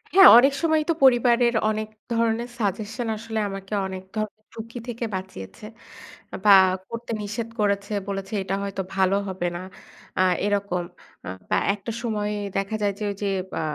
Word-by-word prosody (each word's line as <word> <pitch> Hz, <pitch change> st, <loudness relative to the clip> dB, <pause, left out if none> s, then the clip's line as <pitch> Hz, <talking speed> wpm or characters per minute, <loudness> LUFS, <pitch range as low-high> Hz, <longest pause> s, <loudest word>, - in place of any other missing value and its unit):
হ্যাঁ 385 Hz, -1 st, +10 dB
অনেক 270 Hz, +3 st, +6 dB
সময়ই 315 Hz, -2 st, +2 dB
তো -, -, +4 dB
পরিবারের 245 Hz, -2 st, +5 dB, 0.2 s
অনেক 215 Hz, 0 st, -2 dB, 0.2 s
ধরনের 230 Hz, +1 st, 0 dB
সাজেশন 220 Hz, +3 st, -2 dB
আসলে 220 Hz, 0 st, -4 dB
আমাকে 195 Hz, +1 st, -7 dB
অনেক 190 Hz, 0 st, -7 dB
ধরনের 215 Hz, 0 st, -4 dB
ঝুঁকি 230 Hz, +2 st, -8 dB
থেকে 235 Hz, 0 st, -3 dB
বাঁচিয়েছে। 185 Hz, -, -8 dB, 0.7 s
আ -, -, -3 dB
বা 205 Hz, -, +9 dB, 0.4 s
করতে 230 Hz, 0 st, -6 dB
নিষেধ 215 Hz, +3 st, -4 dB
করেছে, 200 Hz, 0 st, 0 dB
বলেছে 195 Hz, 0 st, -4 dB
"এটা 190 Hz, +1 st, -2 dB
হয়তো 200 Hz, -1 st, -3 dB
ভালো 190 Hz, 0 st, +3 dB
হবে 185 Hz, -2 st, -2 dB
না।" 175 Hz, -, -5 dB, 0.6 s
আ -, -, +5 dB, 0.2 s
এরকম 200 Hz, -3 st, 0 dB, 0.4 s
আ -, -, -3 dB, 0.2 s
বা -, -, +2 dB, 0.2 s
একটা 205 Hz, +3 st, -6 dB
সময়ে 210 Hz, -2 st, -1 dB, 0.2 s
দেখা 195 Hz, +2 st, -1 dB
যায় 205 Hz, -1 st, +1 dB
যে -, -, -4 dB
ওইযে 200 Hz, +1 st, -4 dB, 0.3 s
বা -, -, -2 dB
210 Hz, 160 wpm, -24 LUFS, 195-230 Hz, 0.7 s, হ্যাঁ